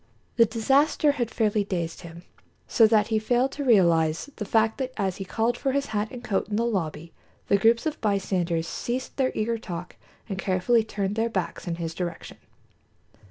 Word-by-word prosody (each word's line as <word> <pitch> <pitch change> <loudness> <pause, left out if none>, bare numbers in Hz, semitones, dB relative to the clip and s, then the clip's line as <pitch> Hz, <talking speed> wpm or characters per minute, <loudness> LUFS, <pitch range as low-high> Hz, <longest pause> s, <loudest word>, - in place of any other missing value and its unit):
The 230 -1 +6
disaster 275 +7 +3
had 245 -5 -2
fairly 215 -3 +1
dazed 175 -4 -4
him, 170 0 -11 0.4
so 225 - +5
that 215 -1 +3
he 220 -1 +2
failed 245 +4 +1
to 285 - -5
realize 170 - +3
the 210 - -4
fact 220 +4 +2
that 260 -1 -2
as 190 -4 -1
he 195 - -5
called 230 +5 0
for 270 +1 -1
his 280 0 0
hat 210 +1 -1
and 245 -2 -9
coat 200 -3 -1
in 205 - -2
the 230 +2 +1
lobby 170 -7 -3 0.4
the 200 - +5
groups 230 +3 +3
of 310 -1 -3
bystanders 185 -5 0
ceased 250 +2 -4
their 265 -2 +1
eager 230 +1 -1
talk 175 -4 -7 0.3
and 195 -3 -5
carefully 190 +5 +2
turned 200 -2 -3
their 225 +2 0
backs 190 -3 -4
in 170 - -1
his 165 -1 -4
direction. 175 -1 -6
215 Hz, 190 wpm, -26 LUFS, 180-235 Hz, 0.4 s, The